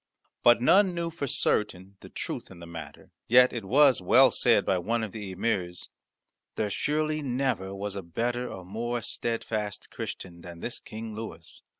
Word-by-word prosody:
But 120 0 +5
none 190 +5 +5
knew 170 -1 -2
for 155 -3 -4
certain 100 -5 0
the - - -12
truth - - -5
in 95 - -12
the 85 - -10
matter. 85 -1 -10 0.2
Yet 125 +2 +6
it 115 -3 -4
was 130 +2 +5
well 90 - +6
said - - +3
by 95 - +2
one 115 +6 -1
of 110 - -4
the 105 -2 -6
emirs, 95 -3 -2 0.7
"There 105 -2 -1
surely 155 +5 0
never 125 -8 -1
was 100 0 -4
better 120 +8 -2
or 95 - -8
more 120 +5 -3
steadfast 110 -3 -3
Christian 85 -2 -7
than 85 -1 -10
this 120 - -4
King 110 0 -8
Louis. 95 -7 -8
110 Hz, 170 wpm, -28 LUFS, 95-125 Hz, 0.7 s, Yet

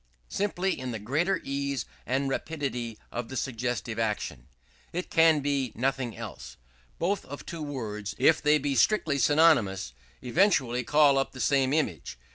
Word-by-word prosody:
Simply 190 -4 -1
in 130 0 -4
the 115 - -3
greater 155 - 0
ease 140 -2 -2 0.2
and 135 +2 0
rapidity 135 -6 -3
of 120 -1 -4
the 130 - -5
suggestive 120 -3 -3
action. 110 -2 -2 0.4
It 180 +2 -4
can 160 -2 +5
be 140 -1 0
in - - -13
nothing 130 -4 -1
else. - - -8 0.4
Both 195 +4 0
of 145 +2 -9
two 165 -2 -6
words, 110 -8 -5
if 140 +5 +4
they 150 +1 +4
be 145 -1 -1
strictly 155 -2 +2
synonymous, 120 - +3 0.3
eventually 130 - +2
call 145 +1 +4
up 135 - -2
the 130 - -10
same 135 +2 +2
image. 90 - -1
135 Hz, 155 wpm, -28 LUFS, 120-155 Hz, 0.4 s, can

